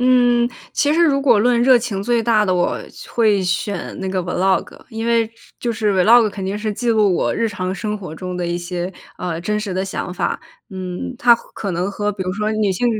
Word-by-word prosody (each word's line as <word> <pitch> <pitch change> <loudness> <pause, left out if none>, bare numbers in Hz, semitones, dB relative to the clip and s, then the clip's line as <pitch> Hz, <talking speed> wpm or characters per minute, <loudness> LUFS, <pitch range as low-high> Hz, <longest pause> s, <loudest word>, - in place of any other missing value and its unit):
嗯， 245 -1 +4 0.2
其 295 +1 +2
实 340 - +4
如 275 -3 +3
果 240 -7 +4
论 240 +1 +3
热 255 0 +6
情 230 -5 -2
最 235 +2 +1
大 215 -2 +3
的， 185 -2 +1
我 175 - 0 0.3
会 215 -4 +3
选 180 +2 -2
那 190 - -3
个 185 -1 -1
Vlog。 185 +2 -1
因 225 0 -4
为 230 -1 +2 0.3
就 235 -1 -1
是 210 -1 0
Vlog， 215 +4 +5
肯 195 -1 -6
定 195 +2 -2
是 210 0 -2
记 240 +3 -3
录 215 -4 +4
我 - - 0
日 230 - 0
常 185 -2 -3
生 210 0 -3
活 180 -5 -8
中 180 +1 -5
的 175 -1 -2
一 175 0 -1
些， 175 +1 -4 0.2
呃， 170 -2 -4
真 210 +4 -1
实 205 -4 -4
的 190 +1 -1
想 180 -2 -4
法。 - - -2 0.3
嗯， 185 +6 -5
它 240 -1 +6
可 200 -4 -6
能 180 +3 -1
和， 205 +1 -2
比 195 -1 -4
如 185 0 -2
说 215 +2 -1
女 215 -2 +1
性 190 +6 0
210 Hz, 270 characters per minute, -19 LUFS, 185-235 Hz, 0.3 s, 热